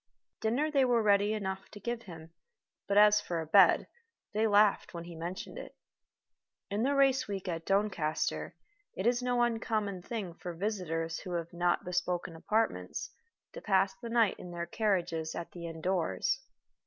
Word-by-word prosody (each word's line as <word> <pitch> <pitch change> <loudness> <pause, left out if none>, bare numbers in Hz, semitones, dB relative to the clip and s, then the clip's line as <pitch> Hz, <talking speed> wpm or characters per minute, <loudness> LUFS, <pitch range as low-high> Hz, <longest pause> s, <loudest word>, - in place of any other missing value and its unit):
Dinner 260 +8 0
they 275 -3 +4
were 240 -3 +3
ready 205 0 +4
enough 190 -2 -4
to 205 - -11
give 235 +3 -3
him, 165 -5 -11 0.6
but 200 - +1
as 210 0 +7
for 175 -4 -3
a 160 - -3
bed, 195 +5 +6 0.5
they 220 +2 +2
laughed 205 -3 +3
when 170 - -5
he 170 0 -9
mentioned 170 +3 -6
it. - - -10 1.0
In 205 +2 0
the 275 +4 +2
race 270 -2 +3
week 195 -2 -4
at 165 -2 -4
Doncaster 195 -6 0 0.4
it 190 - -2
is 240 +1 +3
no 245 -1 +2
uncommon 215 -5 -1
thing 200 -3 -5
for 175 0 -7
visitors 165 -4 -2
who 180 - -6
have 170 -1 -3
not 175 +2 +1
bespoken 180 -1 -2
apartments 220 +7 -1 0.4
to - - -8
pass 195 -1 +2
the 235 - -5
night 230 -4 +2
in 180 - -8
their 170 0 -4
carriages 170 -5 -1
at 170 - -6
the 170 -1 -7
inn 165 -1 -7
doors. 185 - 0
195 Hz, 170 wpm, -31 LUFS, 170-220 Hz, 1.0 s, as